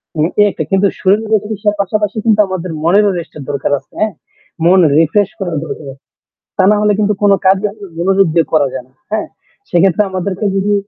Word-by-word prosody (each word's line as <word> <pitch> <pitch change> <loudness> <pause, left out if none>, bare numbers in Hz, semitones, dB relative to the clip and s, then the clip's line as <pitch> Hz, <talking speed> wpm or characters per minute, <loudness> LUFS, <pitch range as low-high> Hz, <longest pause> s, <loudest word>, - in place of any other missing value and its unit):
মানে 155 +1 +1
এই - - +6
একটা 155 - -4
কিন্তু 195 +1 +3
শরীরের 215 +2 +2
চিকিৎসার 210 0 -2
পাশাপাশি 210 +2 -2
কিন্তু 215 -2 +3
আমাদের 185 -2 -4
মনেরও 200 +5 +3
রেস্ট 165 - -10
এর 140 - -7
দরকার 140 0 -2
আছে। 135 - -32
হ্যাঁ? 215 -1 0 0.5
মন 185 +2 +5 0.2
রিফ্রেশ 185 +5 +2
করার 175 -5 -3
দরকার 155 - -7
আছে। 135 - -23 0.5
তা 190 - +3
না - - +4
হলে 210 0 +3
কিন্তু 210 0 +2
কোন 205 - +5
কাজই 190 +2 +3 0.3
মনোযোগ 195 +2 +2
দিয়ে 165 -1 +3
করা 150 -3 +3
যায় 130 -2 -5
না। 130 - -32 0.2
হ্যাঁ? 215 0 -1 0.4
সেক্ষেত্রে 190 +3 +3
আমাদেরকে 190 +2 -3
যদি 200 +1 +1
195 Hz, 195 wpm, -14 LUFS, 170-210 Hz, 0.5 s, এই